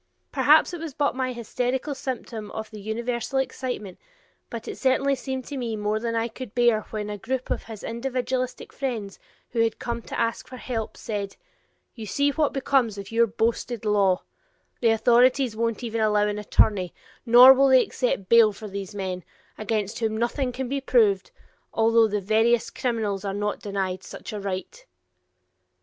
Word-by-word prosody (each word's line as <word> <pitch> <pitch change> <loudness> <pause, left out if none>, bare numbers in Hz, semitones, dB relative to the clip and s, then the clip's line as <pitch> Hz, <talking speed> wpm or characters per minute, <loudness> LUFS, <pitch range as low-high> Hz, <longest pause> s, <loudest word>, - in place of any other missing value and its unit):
Perhaps - - +5
it 350 - -5
was 315 -4 -6
but 285 -2 +1
my 260 -1 -1
hysterical 250 +4 -2
symptom 240 -5 -5
of 220 0 -6
the 215 -2 -9
universal 235 +4 -2
excitement, 250 -7 -3 0.5
but 230 -1 -7
it - - -4
certainly 275 +1 +2
seemed 265 -1 -4
to 285 - -6
me 235 -3 -2
more 210 0 -1
than 230 0 -2
I 230 0 +1
could 235 -1 -9
bear 240 -3 +4
when 210 -1 -4
a 210 -1 -5
group 255 +5 -3
of - - -2
his 220 -3 -9
individualistic 255 +1 -3
friends, 225 -8 -4 0.3
who 235 - -2
had 225 -1 +2
come 235 -1 -4
to - - -6
ask 230 0 -1
for 255 - -9
help, 230 -4 -4
said: 200 -2 -4 0.6
"You 225 -3 -8
see 285 +7 +1
what 300 0 +1
becomes 260 -5 +1
of 200 +1 -8
your 230 +1 +4
boasted 230 +1 -1
law; 200 -3 +2 0.6
the 235 - +3
authorities 240 +2 +4
won't 230 +1 -1
even 230 -1 -2
allow 210 -1 +3
an 210 0 -2
attorney, 200 -3 +2 0.3
nor 245 +2 +9
will 275 +1 +4
they 260 -1 +6
accept 240 -7 -2
bail 230 -1 +6
for 210 +1 -9
these 200 +1 -6
men, 185 -2 -4 0.3
against 215 -1 -2
whom 220 -2 -1
nothing 250 +3 -1
can 260 +1 -4
be 275 +2 -2
proved, 210 -7 +3 0.5
although 225 0 +4
the 210 -1 -2
veriest 225 +4 +2
criminals 215 -5 -2
are 195 -1 -3
not 205 0 -2
denied 190 -2 -3
such - - -9
a 210 - -4
right." 190 -2 -5
230 Hz, 175 wpm, -25 LUFS, 210-255 Hz, 0.6 s, nor